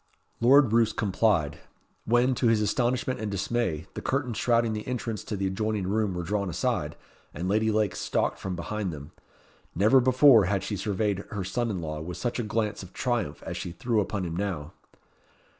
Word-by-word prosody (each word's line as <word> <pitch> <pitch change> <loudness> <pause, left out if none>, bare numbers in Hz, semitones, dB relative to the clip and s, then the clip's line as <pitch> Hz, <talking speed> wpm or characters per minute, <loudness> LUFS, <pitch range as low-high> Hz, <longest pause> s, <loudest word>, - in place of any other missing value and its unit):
Lord 130 0 +5
Roos 115 -1 +3
complied; 95 -7 +1 0.5
when, 120 +3 +3
to 125 0 +1
his 115 -1 +4
astonishment 120 +4 0
and 110 -1 -3
dismay, 100 -5 -1
the - - -6
curtains 130 -4 -1
shrouding 115 -2 +2
the 105 0 -5
entrance 115 -4 -3
to 105 - -3
the 95 - -1
adjoining 105 +1 -1
room 100 -1 0
were 90 - -3
drawn 100 +2 -1
aside, 85 - -1 0.4
and 85 +4 -3
Lady 110 +3 +2
Lake 110 -2 +1
stalked - - -1
from 95 -1 -4
behind 95 +3 -3
them. 70 -2 -9 0.6
Never 110 +9 +5
before 130 -3 +6
had 100 +1 0
she 105 - -3
surveyed 100 0 -1
her 100 -3 -4
son 120 +5 -1
in 95 -5 -3
law 75 -1 -4
with 85 +2 -6
such 120 0 -2
a - - 0
glance 105 -1 -1
of 95 -1 -11
triumph 115 - -2
as - - -5
she 90 - -5
threw 120 +3 0
upon 100 -2 -3
him 85 -1 -4
now. 90 -6 -3
105 Hz, 190 wpm, -27 LUFS, 95-115 Hz, 0.6 s, before